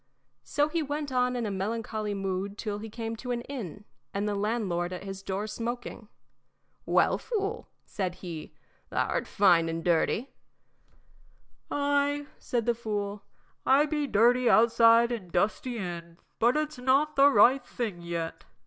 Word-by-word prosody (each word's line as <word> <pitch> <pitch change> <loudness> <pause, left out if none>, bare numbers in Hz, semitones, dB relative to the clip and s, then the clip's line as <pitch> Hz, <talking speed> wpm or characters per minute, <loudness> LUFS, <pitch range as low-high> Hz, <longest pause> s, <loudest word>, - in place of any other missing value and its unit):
So 290 - 0
on 300 - +2
he 335 - 0
went 290 -1 -3
in 250 -1 +1
a 210 - -2
melancholy 215 +1 -3
mood 195 +1 -3
till 210 -2 -3
he 220 +1 -7
came 225 +1 -4
to 250 - -8
an 240 -1 -1
inn, 210 - -7 0.3
and 200 +1 0
the 210 - 0
landlord 200 -4 -1
at 180 - -6
his 195 0 -6
door 195 +2 -3
smoking. 230 0 -5 0.8
"Well, - - +3
fool," 435 -1 -3 0.2
said 185 -3 -3
he, 170 -5 -7 0.4
"thou - - 0
'rt - - -1
fine 175 -5 +4
and 165 0 -3
dirty." 180 +9 +1 1.4
"Ay," 285 0 +1
said 235 -3 -2
the 240 - +3
fool, 205 -3 -4 0.4
"I 275 +3 +5
be 300 -1 -1
dirty 240 +2 +4
outside 230 +1 +6
an' 210 -7 -4
dusty 215 +7 0
in, 170 -4 -6 0.2
but 240 +5 +4
it's 305 -3 -2
not 275 +4 +2
the 280 0 +7
right 265 -1 +5
thing 215 -8 -4
yet." 170 -1 -4
225 Hz, 155 wpm, -28 LUFS, 195-255 Hz, 1.4 s, the